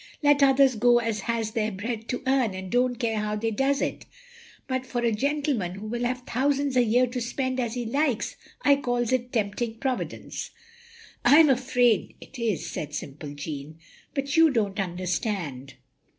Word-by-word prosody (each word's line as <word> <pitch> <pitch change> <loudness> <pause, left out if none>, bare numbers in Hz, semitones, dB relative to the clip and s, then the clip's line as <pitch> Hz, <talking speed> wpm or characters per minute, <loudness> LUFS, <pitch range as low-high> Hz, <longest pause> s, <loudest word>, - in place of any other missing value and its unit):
"Let 290 0 +5
others 270 -1 +5
go 240 +2 +4
as 225 -2 -1
has 225 -2 0
their 220 -1 -1
bread 225 +3 -5
to 250 - -3
earn 260 -7 +2
and 190 -1 -7
don't 245 0 +2
care 230 -3 -1
how 210 0 -1
they 225 +2 -1
does 270 +5 +1
it. - - -4 0.6
But 260 -1 -1
for 250 -2 -3
a 235 - +3
gentleman 270 - -1
who 200 +2 -8
will 240 +2 -2
have 250 +1 -2
thousands 275 +2 0
a 250 - +5
year 240 +3 +3
to 250 0 -4
spend 260 +2 -2
as 240 -1 -2
he 245 -1 -3
likes, 265 0 0 0.3
I 280 -1 +5
calls 245 -3 -1
it 250 -1 0
tempting 225 +1 -1
Providence. 255 +1 -4 0.3
" 475 0 -23
" - - -22
I 290 - +7
am 315 -3 +7
afraid 250 -3 +2
it 270 - -12
is, 225 -6 -1
" - - -7
said 150 -1 -5
simple 145 0 -7
Jeanne. 145 +1 -6 0.2
" - - -28
But 275 0 -1
you 325 -1 +7
don't 210 -6 0
understand. 180 - -3
240 Hz, 195 wpm, -26 LUFS, 210-265 Hz, 0.6 s, I